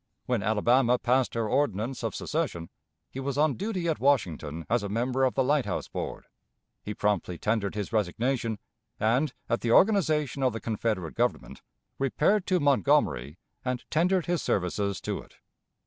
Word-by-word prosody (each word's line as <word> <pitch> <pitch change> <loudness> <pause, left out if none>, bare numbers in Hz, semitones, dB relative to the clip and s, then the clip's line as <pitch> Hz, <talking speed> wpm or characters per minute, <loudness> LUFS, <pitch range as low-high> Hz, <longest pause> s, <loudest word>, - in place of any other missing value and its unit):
When 125 -4 0
Alabama 120 +5 +3
passed 125 +1 +1
her 115 -1 0
ordinance 120 0 0
of 115 - -2
secession, 145 - -3 0.4
he 135 - -6
was 135 0 -3
on 150 -1 +3
duty 190 -4 -3
at 160 - 0
Washington 85 - 0
as 120 +1 +1
a 100 - -4
member 125 +5 0
of 130 - +2
the 135 - +3
Lighthouse 130 -7 0
Board; - - -5 0.6
he 105 - -6
promptly 100 -4 0
tendered 105 -1 -1
his 105 0 -4
resignation, 115 +3 0 0.4
and, 125 +7 +2 0.2
at 115 - 0
the 115 - 0
organization 155 - +3
of 130 -3 +2
the 115 - -4
Confederate 105 -7 -2
Government, - - -2 0.4
repaired 160 +9 +2
to 185 -2 +2
Montgomery 95 - +2 0.3
and 125 -2 -3
tendered 180 +2 +2
his 175 -2 0
services 100 +1 -1
to - - -3
it. - - -19
120 Hz, 160 wpm, -28 LUFS, 105-145 Hz, 0.6 s, Alabama